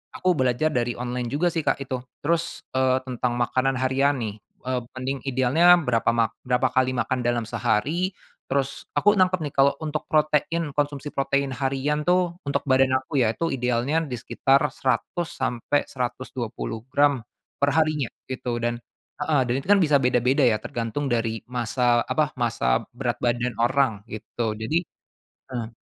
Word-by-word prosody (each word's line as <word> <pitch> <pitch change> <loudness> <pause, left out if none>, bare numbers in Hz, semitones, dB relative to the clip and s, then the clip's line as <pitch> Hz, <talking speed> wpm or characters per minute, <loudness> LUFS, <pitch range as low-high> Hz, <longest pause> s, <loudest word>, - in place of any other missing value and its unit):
aku 185 - 0
belajar 130 +4 +2
dari 120 -3 0
online 125 0 -3
juga 175 +4 +2
sih, 165 -2 -3
Kak, 140 - +1
itu. 130 -1 -3 0.3
Terus, 165 +2 -1 0.2
eee, 130 0 +3
tentang 125 -1 -2
makanan 130 +2 +1
harian 135 +2 +2
nih, 105 -1 -4 0.2
eee, 125 -1 -2
mending 130 +1 -3
idealnya 135 +7 +5
berapa 115 -5 +1
mak 115 -1 0
berapa 125 0 +2
kali 130 0 +1
makan 125 +1 -1
dalam 120 -1 +1
sehari, 145 - 0 0.3
terus 135 0 -2
aku 205 0 +3
nangkep 185 -2 +3
nih 145 -2 -4
kalau 140 +1 +5
untuk 155 0 -3
protein, 155 +1 +1
konsumsi 145 0 -1
protein 140 0 0
harian 140 +3 -1
tuh, 180 -1 +2
untuk 140 - 0
badan 130 0 +4
aku 140 +2 -4
ya, 110 - +1
itu 165 +5 -1
idealnya 125 +5 0
di 135 - -7
sekitar 135 +2 +2
100 170 +6 -2
sampai 125 +3 0
120 125 -3 -4
gram 140 -5 +3 0.3
per 140 0 +2
harinya, 155 -4 +2 0.2
gitu. 125 -2 -3
Dan 120 0 -1 0.4
heeh. 155 -3 +1
Dan 125 - +1
itu - - -10
kan 200 - +7
bisa 150 -3 +4
beda-beda 125 +1 +2
ya, 110 -3 +4
tergantung 120 +4 -3
dari 115 -1 0
massa, 120 0 +1
apa, 155 -1 +1
massa 115 - +1
berat 120 -1 -2
badan 120 -1 -1
orang, 120 -4 +1
gitu. 110 +1 -3
Jadi 110 +9 -1 0.7
heeh. 120 -3 -3
130 Hz, 160 wpm, -24 LUFS, 120-145 Hz, 0.7 s, kan